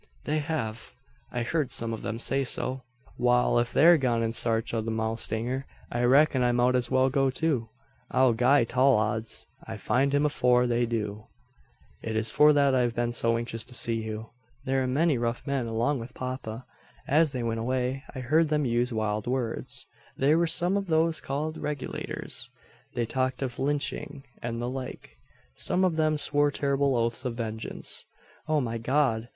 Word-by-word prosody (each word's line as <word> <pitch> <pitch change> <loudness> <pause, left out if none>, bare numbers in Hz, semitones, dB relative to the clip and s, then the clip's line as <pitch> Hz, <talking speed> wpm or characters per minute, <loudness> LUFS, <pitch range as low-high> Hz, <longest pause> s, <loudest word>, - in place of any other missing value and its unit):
"They 155 +1 0
have. 145 -8 -4 0.4
I 120 -1 -1
heard 145 +1 -1
some 115 -3 -1
of 110 - -5
them 115 - -3
say 135 +3 +1
so." 130 0 -1 0.4
"Wal, 125 0 +3
if 120 0 -1
they're 170 +2 +6
gone 120 -3 +1
in 115 0 -1
sarch 115 -1 0
o' 115 - 0
the 110 - -4
mowstanger 115 +3 -2 0.3
I 120 +1 0
reck'n 135 +1 +4
I 125 0 +3
mout 120 +1 +3
as 125 -1 0
well 130 0 +3
go 135 0 +2
too. 130 -4 -1 0.4
I'll 130 -2 +4
gie 125 +3 +4
tall 130 +3 +4
odds 110 +1 -1 0.2
I - - -7
find 135 +2 +1
him 145 +1 +2
afore 125 -4 +3
they 120 0 +1
do." 105 -2 -3 0.7
"It 110 - -4
is 110 0 -1
for 150 0 +6
that 140 -2 +3
I've 120 -2 +1
been 120 0 0
so 115 -1 +1
anxious 115 -1 -2
to 125 - -11
see 115 - +1
you. 110 0 -6 0.3
There 135 0 +1
am 130 -1 -1
many 155 -4 +2
rough 120 0 -2
men 135 -4 -1
along 120 +5 0
with 120 +2 -9
papa. 125 -2 -5 0.4
As 155 +1 +3
they 125 -3 -3
went 115 -1 -1
away 130 +3 -1
I 130 - -4
heard 155 +5 +2
them 150 -2 +1
use 120 +1 +1
wild 110 -1 -2
words. 125 -2 -3 0.3
There 150 +4 +3
were 170 - +2
some 175 +4 +2
of 200 -1 -3
those 160 0 +2
called 155 +3 -3
`Regulators.' 145 -3 -5 0.5
They 120 - 0
talked 130 +2 -1
of 125 -2 -5
lynching 145 0 -2 0.2
and 115 0 -3
the 120 - -2
like. 130 0 -7 0.4
Some 185 +1 +1
of 175 -3 +1
them 155 -1 +2
swore 145 0 +2
terrible 140 -1 +1
oaths 115 +2 0
of 125 -3 -3
vengeance. 110 -1 -4 0.4
O 155 -1 +2
my 115 -3 -2
God! 120 -2 +1
125 Hz, 185 wpm, -27 LUFS, 115-140 Hz, 0.7 s, they're